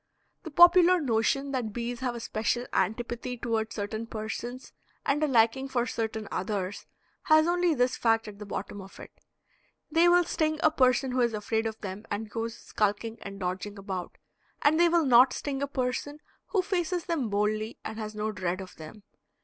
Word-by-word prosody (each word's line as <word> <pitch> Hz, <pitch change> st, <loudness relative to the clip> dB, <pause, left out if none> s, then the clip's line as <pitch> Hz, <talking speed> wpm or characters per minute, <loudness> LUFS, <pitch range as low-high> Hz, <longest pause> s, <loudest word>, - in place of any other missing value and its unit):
The 325 Hz, -, -7 dB
popular 350 Hz, +3 st, +7 dB
notion 275 Hz, +1 st, +1 dB
that 240 Hz, -6 st, -2 dB
bees 240 Hz, +1 st, -4 dB
have 250 Hz, -2 st, -2 dB
a -, -, -5 dB
special 230 Hz, +2 st, -1 dB
antipathy 240 Hz, +5 st, -1 dB
toward 225 Hz, -1 st, -1 dB
certain 220 Hz, +2 st, -4 dB
persons 230 Hz, +3 st, -6 dB, 0.3 s
and 295 Hz, +2 st, +1 dB
a -, -, +3 dB
liking 255 Hz, +1 st, +3 dB
for 245 Hz, -3 st, 0 dB
certain 220 Hz, -2 st, -3 dB
others 195 Hz, -1 st, -3 dB, 0.4 s
has 310 Hz, 0 st, +6 dB
only 350 Hz, -1 st, +2 dB
this 250 Hz, -1 st, +1 dB
fact 225 Hz, -1 st, +2 dB
at 205 Hz, -1 st, -10 dB
the 210 Hz, -, -7 dB
bottom 205 Hz, 0 st, -5 dB
of 190 Hz, 0 st, -13 dB
it; -, -, -10 dB, 0.8 s
they 335 Hz, +2 st, +5 dB
will 355 Hz, 0 st, +5 dB
sting 310 Hz, -2 st, -1 dB
a 315 Hz, -, +5 dB
person 255 Hz, -2 st, +3 dB
who 250 Hz, 0 st, +1 dB
is 235 Hz, -2 st, +1 dB
afraid 220 Hz, +2 st, -1 dB
of 220 Hz, 0 st, -6 dB
them 200 Hz, +2 st, -6 dB
and 210 Hz, +1 st, -4 dB
goes 230 Hz, +1 st, -4 dB
skulking 215 Hz, +2 st, -2 dB
and 200 Hz, 0 st, -8 dB
dodging 190 Hz, +3 st, -4 dB
about, 190 Hz, -3 st, -6 dB, 0.5 s
and 310 Hz, +3 st, +4 dB
they 345 Hz, 0 st, +6 dB
will 335 Hz, -2 st, +3 dB
not 255 Hz, 0 st, +6 dB
sting 275 Hz, -2 st, -3 dB
a 280 Hz, -, 0 dB
person 270 Hz, +2 st, -2 dB, 0.3 s
who 385 Hz, -3 st, +1 dB
faces 360 Hz, -2 st, -1 dB
them 315 Hz, -10 st, -1 dB
boldly 215 Hz, +2 st, -1 dB
and 220 Hz, +1 st, -5 dB
has 215 Hz, -1 st, -5 dB
no 215 Hz, +1 st, -2 dB
dread 185 Hz, -2 st, -2 dB
of 190 Hz, -1 st, -9 dB
them. 160 Hz, +7 st, -11 dB
230 Hz, 185 wpm, -28 LUFS, 215-280 Hz, 0.8 s, popular